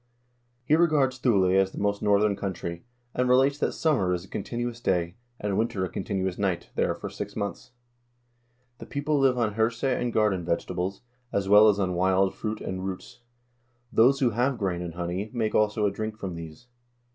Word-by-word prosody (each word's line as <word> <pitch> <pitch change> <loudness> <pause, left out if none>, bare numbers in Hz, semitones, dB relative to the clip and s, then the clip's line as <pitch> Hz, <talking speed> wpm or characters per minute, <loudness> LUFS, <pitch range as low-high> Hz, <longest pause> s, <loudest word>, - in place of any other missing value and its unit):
He 150 - +4
regards 150 -6 +2
Thule 110 -7 +3
as 95 0 +3
the - - -11
most 100 0 0
northern 105 0 +3
country, 85 -3 -5 0.3
and 125 0 0
relates 135 +3 +4
that - - 0
summer 100 - +1
is 90 +1 -6
a - - -18
con - - -4
tinuous 120 0 -4
day, 85 -5 0 0.3
and 100 -2 -1
winter 110 -4 0
a - - -6
continuous 95 -1 -3
night, 95 -4 -1
there - - 0
for - - -6
six 100 0 -7
months. 105 +4 -4 1.1
"The - - -9
people 145 +1 -1
live 135 -2 +3
on 110 -4 0
hirse 115 +2 0
and 125 -2 0
garden 105 -5 +1
vegetables, 90 +4 -2 0.3
as 100 -1 -1
well 105 +2 +7
as 100 - +2
on 95 -2 0
wild 95 +2 +2
fruit 110 -1 -4
and 95 0 -4
roots. 95 +5 -7 0.7
Those 135 +5 +4
who 125 -3 +3
have 125 +4 0
grain 95 -4 -2
and 85 -2 -6
honey 90 +4 -3
make 110 -2 0
also 105 0 +2
a 100 - +2
drink 110 +1 -5
from 95 -5 -5
these. 80 +5 -9
105 Hz, 190 wpm, -26 LUFS, 95-120 Hz, 1.1 s, well